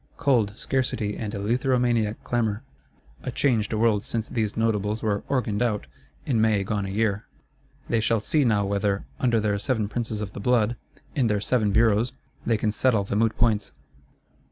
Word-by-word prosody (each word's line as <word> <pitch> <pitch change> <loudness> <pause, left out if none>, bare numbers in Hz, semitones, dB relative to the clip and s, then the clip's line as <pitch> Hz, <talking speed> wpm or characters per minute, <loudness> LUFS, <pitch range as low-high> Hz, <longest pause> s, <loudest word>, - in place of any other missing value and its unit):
Cold, 115 -8 +2
scarcity 120 -6 -1
and 105 -3 -4
eleutheromaniac 120 0 +1
clamour: 115 -2 -1 0.6
a - - -4
changed 120 -4 +1
world 110 -2 +2
since 115 -1 -3
these 110 -4 -2
Notables 110 -1 0
were 105 -2 0
"organed 120 -6 0
out," 110 -4 0 0.4
in 115 -5 +1
May 110 -3 +3
gone 100 0 -2
a - - -5
year! 105 +1 -1 0.6
They 115 - +1
shall 110 +1 +2
see 150 +8 +1
now 105 -5 +2
whether, 100 0 0
under 120 -3 +2
their 105 -1 0
Seven 110 -2 0
Princes 110 0 -3
of 105 -2 -5
the - - -7
Blood, 120 +1 +2 0.4
in 130 -5 +2
their 105 -1 +1
Seven 105 0 +1
Bureaus, 115 +3 +3 0.3
they 115 -2 +3
can 105 0 0
settle 110 -2 +2
the 100 - -3
moot 110 +1 +1
points. 115 -3 +1
110 Hz, 170 wpm, -25 LUFS, 105-120 Hz, 0.6 s, May